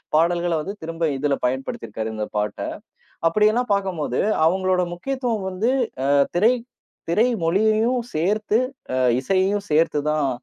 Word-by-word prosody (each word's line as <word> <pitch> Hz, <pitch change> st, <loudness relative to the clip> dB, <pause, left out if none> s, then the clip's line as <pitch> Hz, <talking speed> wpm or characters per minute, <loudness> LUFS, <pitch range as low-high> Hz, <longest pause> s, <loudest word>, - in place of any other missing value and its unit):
பாடல்கள 170 Hz, +1 st, +2 dB
வந்து 195 Hz, +6 st, -5 dB
திரும்ப 165 Hz, 0 st, -2 dB
இதில 145 Hz, +1 st, 0 dB
பயன்படுத்திருக்காரு 120 Hz, -4 st, -3 dB
இந்த 110 Hz, 0 st, -2 dB
பாட்ட. 105 Hz, 0 st, -2 dB, 0.7 s
அப்டியேல்லாம் 215 Hz, +6 st, +2 dB
பார்க்கும்போது 180 Hz, -10 st, -1 dB, 0.3 s
அவங்களோட 185 Hz, +1 st, +2 dB
முக்கியத்துவம் 235 Hz, 0 st, -2 dB
வந்து, 205 Hz, +7 st, 0 dB, 0.4 s
அ -, -, +4 dB, 0.2 s
திரை 220 Hz, +7 st, +5 dB, 0.6 s
திரை 220 Hz, +8 st, +3 dB, 0.2 s
மொழியையும் 220 Hz, +7 st, +2 dB
சேர்த்து, 210 Hz, +7 st, +1 dB, 0.4 s
அ -, -, 0 dB, 0.3 s
இசையையும் 195 Hz, +5 st, +1 dB
சேர்த்துதான் 150 Hz, -2 st, +2 dB
185 Hz, 115 wpm, -22 LUFS, 155-215 Hz, 0.7 s, திரை